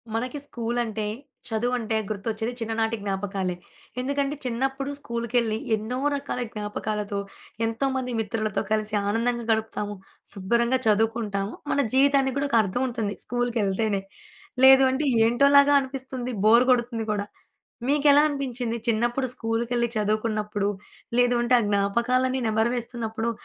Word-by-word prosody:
మనకి 250 +5 -2
స్కూలంటే, 230 -3 -2 0.4
చదువంటే 225 0 -1
గుర్తొచ్చేది 220 +2 -3
చిన్ననాటి 225 0 -1
జ్ఞాపకాలే. 195 -2 -2 0.4
ఎందుకంటే 280 +2 -1
చిన్నప్పుడు 270 +3 -2
స్కూలు‌కెళ్లి 235 -3 -1 0.2
ఎన్నో 220 +4 -4 0.2
రకాల 280 -3 -4
జ్ఞాపకాలతో, 210 -1 -3 0.5
ఎంతోమంది 255 +2 -1
మిత్రులతో 215 -1 -1
కలిసి 215 0 +1
ఆనందంగా 235 +3 0
గడుపుతాము. 220 -2 -2 0.4
శుభ్రంగా 235 +6 +1
చదువుకుంటాము. 215 -2 +1 0.2
మన - - +1
జీవితానికి 270 -1 +3
కూడా 280 +1 0
ఒక 235 - +3
అర్థం 200 +5 -2
ఉంటుంది 225 -4 -3
స్కూలుకెళ్తేనే. 220 -4 0 0.6
లేదు 265 0 +9
అంటే 275 +3 -1 0.2
ఏంటోలాగా 280 +4 +5
అనిపిస్తుంది 260 -2 -5
బోర్ 235 +3 +6
కొడుతుంది 235 -2 0
గూడా. 205 -1 -1 0.6
మీకెలా 290 0 +5
అనిపించింది 250 -5 -3
చిన్నప్పుడు 240 +4 +1
స్కూలు‌కేళ్లి 235 +1 -1
చదువుకున్నప్పుడు? 215 -1 0 0.5
లేదు 245 0 +4
అంటే 240 +1 +3
ఆ - - -1
జ్ఞాపకాలన్నీ 240 +6 +1
నెమరు 220 +2 +1
వేస్తున్నప్పుడు. 230 -1 -3
235 Hz, 115 wpm, -25 LUFS, 215-255 Hz, 0.6 s, లేదు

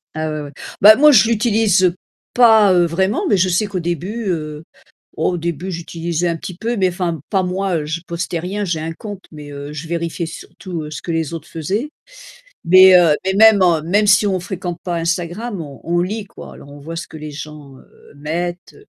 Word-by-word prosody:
Ah 155 0 -2
ouais, 155 0 -4
ouais. 145 - -8 0.3
Ben 215 +2 +9
moi 300 +4 +6
je 235 -3 +5
l'utilise, 215 -4 +2
heu, 180 -1 +3 0.4
pas 220 -5 +6
vraiment, 190 +5 0
mais 205 - +3
je 185 +1 +2
sais 185 +4 +1
qu'au 195 -3 -4
début, 180 +7 -4
heu, 155 -2 -4 0.5
au 180 - 0
début 170 +2 -4
j'utilisais 170 0 -3
un 170 - -1
petit 180 +2 -8
peu, 230 +3 -2
mais 185 -1 +2
enfin, 175 -3 -3
pas 190 -3 +1
moi. 180 -3 -2
Je 155 +3 -4
postais 170 0 -3
rien, 195 +5 -3
j'ai 170 -4 -2
un 160 +1 -4
compte, 205 -1 -9
mais, 150 -2 -10
heu, 140 +1 -8
je 150 +2 -7
vérifiais 170 0 -3
surtout 165 -1 -8
ce 155 - -6
que 170 - -4
les 165 -1 -2
autres 165 0 -9
faisaient. 200 - -3 0.7
Mais, 185 +2 +8
heu, 165 -4 +4
mais 190 - +1
même 215 0 +6 0.2
même 205 +5 +2
si 205 +1 +5
on 190 -2 0
fréquente 180 -2 -5
pas 175 -2 -3
Instagram, 175 +5 -3
on 140 -5 -10
on 175 +1 0
lit 205 +4 -3
quoi, - - -12
alors 140 - -14
on 145 - -12
voit 165 +4 -8
ce 165 - -6
que - - -11
les 155 0 -8
gens, 145 -2 -10
heu, - - -21
mettent. 175 +5 -5
175 Hz, 205 wpm, -18 LUFS, 160-195 Hz, 0.7 s, Ben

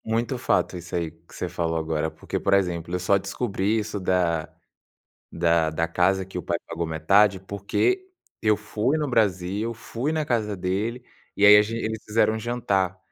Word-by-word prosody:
Muito 115 +3 -1
fato 120 - +1
isso 85 0 -7
aí 85 -2 -1
que 80 +1 -19
você 90 - -3
falou 85 -1 -2
agora, 80 0 -1
porque, - - -5
por - - +3
exemplo, 90 -3 -1
eu - - -1
só 90 +2 +3
descobri 100 +1 -1
isso 105 -1 -3
da 90 -4 0 0.8
da 85 -1 +2
da 80 +1 -1
casa 90 +3 +1
que 95 -1 -7
o - - -4
pai 85 - -1
pagou 85 0 -3
metade, 95 +6 +3
porque 100 - -1 0.3
eu 105 -1 +3
fui 110 +6 -1
no 155 -1 -1
Brasil, 105 -1 0
fui 120 +6 -3
na 155 -1 0
casa 110 -6 -1
dele, 100 +7 -2 0.3
e 100 - +3
aí 105 0 +10
a - - +6
ge 110 +2 -4
eles 110 -1 -3
fizeram 110 0 +2
um - - -3
jantar. 100 -6 -1
100 Hz, 190 wpm, -25 LUFS, 85-110 Hz, 0.8 s, aí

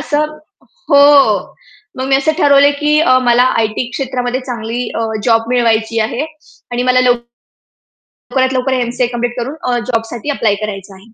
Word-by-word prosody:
असं 305 0 -2 0.5
हो. 280 -6 +4 0.4
मग 260 - -2
मी 270 - +4
असं 280 +3 +1
ठरवलंय 285 -2 +5
की 300 +1 +2 0.3
मला 240 +1 +5 0.2
आय-टी 225 +2 -1
क्षेत्रामध्ये 255 -1 -3
चांगली 235 0 -4 0.2
अ, 225 - -1 0.2
जॉब 225 -1 +2
मिळवायची 230 -1 +1
आहे. 250 +6 -3 0.5
आणि 245 +1 -1
मला 255 - +3 1.1
लवकरात 260 0 -2
लवकर 260 +1 -1
एम-सी-ए 245 -1 0
कंप्लीट 240 0 -3
करून 260 +5 -4 0.2
अ, 240 - +1
जॉबसाठी 230 +3 -3
अप्लाय 210 -3 +2
करायचं 195 -2 -6
आहे. 190 - -16
245 Hz, 145 wpm, -14 LUFS, 230-275 Hz, 1.1 s, ठरवलंय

